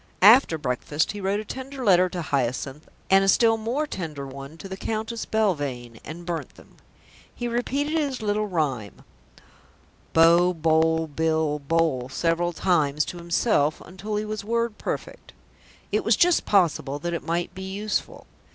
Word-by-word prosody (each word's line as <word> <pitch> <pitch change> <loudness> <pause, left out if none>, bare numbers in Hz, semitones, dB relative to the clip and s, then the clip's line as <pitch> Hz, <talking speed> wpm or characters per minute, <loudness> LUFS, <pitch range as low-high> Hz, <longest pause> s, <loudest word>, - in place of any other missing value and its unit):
After 215 -5 +7
breakfast 145 +2 -1
he 205 - -7
wrote 195 +2 0
a 215 - -6
tender 260 +2 -6
letter 185 -2 +5
to 175 -1 -4
Hyacinth 135 +1 -2 0.2
and 195 0 +6
a - - +1
still 225 +3 +5
more 235 +7 -2
tender 155 - -6
one 135 +3 -9
to 195 - -9
the 190 - -6
Countess 220 +3 -4
Belvane, 145 - -1
and 170 +2 -8
burnt 170 -2 -4
them. - - -19 0.6
He 240 - -3
repeated 270 +5 -1
his 290 -5 -1
little 210 0 -1
rhyme, 140 - -2 1.1
"Bo, 170 +2 +5
Boll, 160 0 +2
Bill, 160 0 0
Bole," 140 -4 0
several 165 +5 0
times 150 -4 +1
to 180 - -7
himself 170 -3 +1
until 195 +4 -6
he 210 +1 -1
was 215 -1 -4
word 230 0 -1
perfect. - - -6 0.6
It - - +1
was - - +4
just 355 -1 +3
possible 160 -8 +2
that 170 +3 -4
it 170 - -2
might 170 +2 -2
be 190 - -8
useful. 200 +3 -3
175 Hz, 160 wpm, -25 LUFS, 155-215 Hz, 1.1 s, After